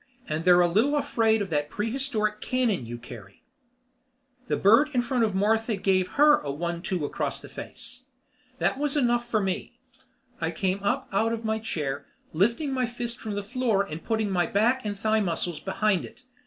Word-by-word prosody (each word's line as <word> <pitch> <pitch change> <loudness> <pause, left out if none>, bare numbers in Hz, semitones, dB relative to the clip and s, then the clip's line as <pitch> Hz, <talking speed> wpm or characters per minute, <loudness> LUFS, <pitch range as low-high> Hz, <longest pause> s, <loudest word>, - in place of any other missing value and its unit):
And 155 +2 -3
they're 180 -1 +7
a 175 - +4
little 225 +12 +2
afraid 225 -7 +2
of 190 - -8
that 145 -1 0
prehistoric 215 -2 -1
cannon 235 - 0
you 120 +1 -5
carry." 115 -5 -12 1.0
The - - 0
bird 230 +10 +5
in 245 - +3
front 245 -1 +1
of 210 -4 0
Martha 220 +3 +2
gave 185 -1 +1
her 295 +1 +6
a 145 - -6
one 170 +4 -3
two 180 -5 -2
across - - -2
the - - -11
face. - - -8 0.5
That 270 - 0
was 295 0 0
enough 240 -3 +1
for 220 - +2
me. 195 +6 -3 0.6
I 160 - -1
came 190 +3 -1
up 260 +7 0
out 225 +4 +1
of 225 0 -4
my 220 0 0
chair, 145 -9 -3 0.3
lifting 235 - +1
my 255 -2 0
fist 240 0 -5
from 215 -2 -4
the 205 - -3
floor 225 -2 +1
and 165 -4 -7
putting 220 -3 0
my 175 -3 +1
back 240 +6 +2
and 205 -2 -3
thigh 220 +2 +2
muscles 175 -3 -1
behind 195 -1 0
it. - - -15
210 Hz, 190 wpm, -26 LUFS, 180-240 Hz, 1.0 s, they're